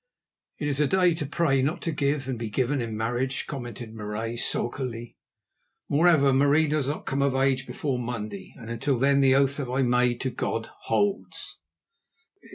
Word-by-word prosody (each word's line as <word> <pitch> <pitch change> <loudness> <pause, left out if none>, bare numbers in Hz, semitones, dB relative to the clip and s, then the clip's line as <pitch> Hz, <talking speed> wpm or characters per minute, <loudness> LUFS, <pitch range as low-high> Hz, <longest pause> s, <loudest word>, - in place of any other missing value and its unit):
"It 145 - -2
is 145 -1 -1
a 150 - +4
day 180 +1 +4
to 150 -3 -3
pray, 150 -4 +2
not 145 +6 -1
to 165 - -1
give 140 -2 0
and 130 -3 -3
be 115 -2 -3
given 130 +4 0
in 115 -2 -4
marriage," 120 +4 -1
commented 120 -4 -7
Marais 110 +2 -4
sulkily. 120 -1 -2 0.7
"Moreover, 145 -3 +4
Marie 145 +4 +4
does 150 -2 0
not 145 - -3
come 135 +1 -1
of 140 -1 +2
age 135 -1 +1
before 130 +1 -2
Monday, 105 -5 -5
and 115 -3 -8
until 130 +3 0
then 140 +2 +3
the 135 -1 +5
oath 140 0 +3
that 135 -4 -3
I 130 +2 +1
made 125 -1 +2
to 130 - -1
God 115 -1 -3 0.2
holds." 200 - -1
135 Hz, 175 wpm, -26 LUFS, 120-140 Hz, 0.7 s, the